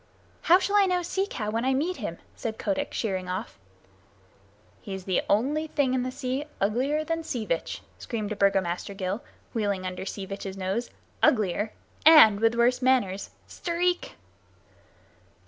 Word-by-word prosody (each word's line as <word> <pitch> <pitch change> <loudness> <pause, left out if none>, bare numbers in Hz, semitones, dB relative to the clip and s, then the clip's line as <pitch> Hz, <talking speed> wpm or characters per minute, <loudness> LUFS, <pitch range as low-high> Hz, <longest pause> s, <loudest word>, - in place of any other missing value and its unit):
"How 350 +2 +6
shall 400 +2 +1
I 400 -1 +5
know 360 -1 +1
Sea 385 +3 -1
Cow 210 -2 -3
when 230 +2 -1
I 265 +1 +2
meet 335 +7 -1
him?" - - -5 0.2
said 220 -1 -4
Kotick, 285 -1 -2
sheering 190 -4 -2
off. 185 - -5 1.2
"He's 190 -2 -6
the 185 -2 +1
only 285 +9 +1
thing 280 -4 +1
in 260 - +1
the 255 - -2
sea 260 +2 -3
uglier 260 +10 +1
than 330 +1 -2
Sea 240 -8 -3
Vitch," 170 -4 -3 0.2
screamed 215 -3 -4
a - - -1
Burgomaster 195 -1 +1
gull, 190 +3 -3 0.3
wheeling 200 -5 -1
under 185 +1 -5
Sea 195 - -5
Vitch's 195 0 -6
nose. 195 +6 -2 0.3
"Uglier, 210 -1 +2 0.3
and 295 -10 +8
with 225 +1 +3
worse 245 +2 +3
manners! 245 -7 +1 0.2
Stareek!" 355 +1 -1
230 Hz, 155 wpm, -27 LUFS, 200-290 Hz, 1.2 s, and